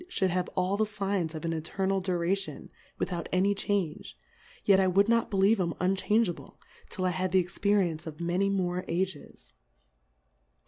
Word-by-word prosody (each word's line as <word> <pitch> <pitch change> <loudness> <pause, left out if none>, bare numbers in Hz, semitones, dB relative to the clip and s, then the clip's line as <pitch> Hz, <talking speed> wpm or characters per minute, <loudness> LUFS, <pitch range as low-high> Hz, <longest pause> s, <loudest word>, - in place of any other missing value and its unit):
ould 190 -3 +2
have 180 0 -1
all 185 +2 +1
the 215 - +2
Signs 195 -5 -2
of 155 - -5
an 165 - -1
Eternal 190 +4 -1
Duration, 185 +1 -2 0.3
with - - -2
out 170 -2 -4
any 190 +3 +3
Change; 185 - -2 0.5
yet 195 -2 +6
I 190 - +3
would 195 +3 +4
not 230 0 +2
be 195 - -2
lieve 200 +3 +4
'em 170 -2 -1
unchangeable, 195 +2 0 0.3
till 185 - -3
I 180 - +2
had 185 +1 -2
the 190 - +4
.Experience 180 -2 +1
of 155 0 -8
many 175 +3 +1
more 180 -2 -1
Ages. 175 - -4
185 Hz, 170 wpm, -29 LUFS, 175-195 Hz, 0.5 s, yet